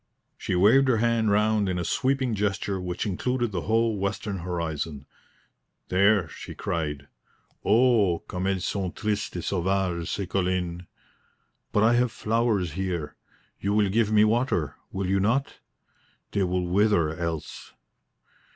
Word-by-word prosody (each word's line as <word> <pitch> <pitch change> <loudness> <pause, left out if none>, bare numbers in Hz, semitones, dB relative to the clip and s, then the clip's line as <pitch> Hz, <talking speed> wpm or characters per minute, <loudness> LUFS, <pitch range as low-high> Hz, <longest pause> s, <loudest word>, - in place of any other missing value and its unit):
She - - -3
waved 115 +9 +5
her 125 -3 +3
hand 115 -1 +2
round 105 -1 +2
in 90 - -1
a 90 - -1
sweeping 130 +1 0
gesture 100 -2 -1
which 90 -1 -3
included 120 +4 -1
the 90 -3 -2
whole 110 +2 +1
western 100 0 -3
horizon. 80 -5 -4 0.8
"There," 100 -1 +3
she - - -9
cried. 75 -4 -3 0.6
"O 110 -5 +3
comme 90 +1 -3
elles 95 -1 -1
sont 95 -3 -2
tristes 105 -3 -2
et 85 - -4
sauvages, 90 -2 -1
ces 100 - -2
collines! 90 -2 -1 0.8
But 105 - +2
I 115 +2 +5
have 120 0 +2
flowers 110 -6 0
here. 90 -3 -3 0.4
You 100 +1 0
will 105 -2 +3
give 110 +1 +1
me 105 -1 +5
water, 110 - +1 0.2
will 95 0 -3
you 95 +1 +1
not? 120 +8 0 0.7
They 100 - 0
will 90 -1 0
wither 90 -4 +2
else." 85 -2 -5
100 Hz, 140 wpm, -26 LUFS, 90-110 Hz, 0.8 s, waved